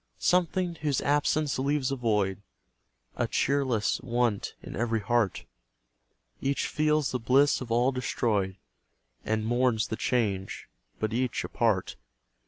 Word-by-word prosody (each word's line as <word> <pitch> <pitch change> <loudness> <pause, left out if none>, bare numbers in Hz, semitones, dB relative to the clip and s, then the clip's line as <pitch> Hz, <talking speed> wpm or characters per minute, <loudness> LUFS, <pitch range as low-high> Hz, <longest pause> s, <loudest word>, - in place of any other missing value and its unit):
Something 180 0 +1
whose 145 -4 +1
absence 145 0 +1
leaves 140 0 0
a - - 0
void 105 -6 0 0.8
A - - +1
cheerless 130 -6 +1
want 120 -4 -1
in - - -7
every 115 0 0
heart; 115 -2 0 1.0
Each 140 +1 0
feels 155 -1 +1
the 125 - -1
bliss 135 +5 +3
of 120 -3 -6
all 120 +3 +3
destroyed, 110 -7 -1 0.7
And 110 0 0
mourns 120 -1 +1
the - - -2
change 100 -6 -1 0.3
but 110 0 -1
each 125 +1 -1
apart. 110 -6 0
125 Hz, 125 wpm, -28 LUFS, 110-140 Hz, 1.0 s, bliss